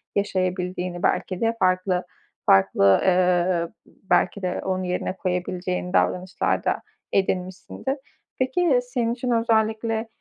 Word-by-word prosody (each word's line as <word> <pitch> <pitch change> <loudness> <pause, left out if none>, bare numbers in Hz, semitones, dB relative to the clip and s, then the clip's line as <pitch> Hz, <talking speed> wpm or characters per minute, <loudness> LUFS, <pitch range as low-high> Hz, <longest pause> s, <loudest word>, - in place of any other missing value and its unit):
yaşayabildiğini 185 -2 -1
belki 185 -2 0
de 230 0 +1
farklı, 185 -1 +2 0.4
farklı, 95 0 +5
ııı, 180 -2 +2 0.4
belki 200 - +2
de 180 -1 -2
onu 185 -1 -1
yerine 180 +1 -2
koyabileceğin 180 0 -2
davranışlar 185 +1 +1
da - - 0 0.3
edinmişsindir. 190 +8 -1 0.4
Peki, 260 +1 +2
senin 245 -2 -1
için 245 0 -3
özellikle, 225 0 +1
185 Hz, 105 wpm, -24 LUFS, 180-225 Hz, 0.4 s, farklı